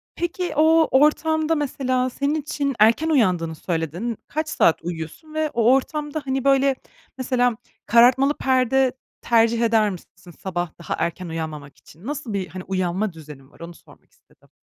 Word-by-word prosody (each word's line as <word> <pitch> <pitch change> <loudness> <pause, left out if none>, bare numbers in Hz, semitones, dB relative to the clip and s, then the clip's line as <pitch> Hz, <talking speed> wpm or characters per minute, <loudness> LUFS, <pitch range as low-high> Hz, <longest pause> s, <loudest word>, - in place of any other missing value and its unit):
Peki 350 +1 -3
o 320 +1 +4
ortamda 315 +1 +2
mesela 260 -3 -1
senin 280 +4 -1
için 280 -2 -3
erken 230 +9 +4
uyandığını 180 - +1
söyledin, 170 +8 -3
kaç 310 +1 -3
saat 165 - +3
uyuyorsun 170 - -7
ve 310 -1 -1
o 235 +2 +4
ortamda 295 +3 -2
hani 265 -1 -1
böyle 275 0 +3 0.4
mesela 245 -2 0 0.3
karartmalı 250 +5 +5
perde 260 0 +2 0.3
tercih 230 0 +2
eder 225 -2 +3
misin 180 -1 -11
sabah 175 -3 -3
daha 170 - -4
erken 175 +1 -3
uyanmamak 155 -3 -6
için? 165 +7 -18
Nasıl 280 -6 -5
bir 190 -2 -2
hani 180 +3 -8
uyanma 185 +2 -2
düzenin 150 -4 -13
var - - -22
onu 170 +1 -9
sormak - - -21
istedim? - - -29
235 Hz, 150 wpm, -22 LUFS, 175-280 Hz, 0.4 s, karartmalı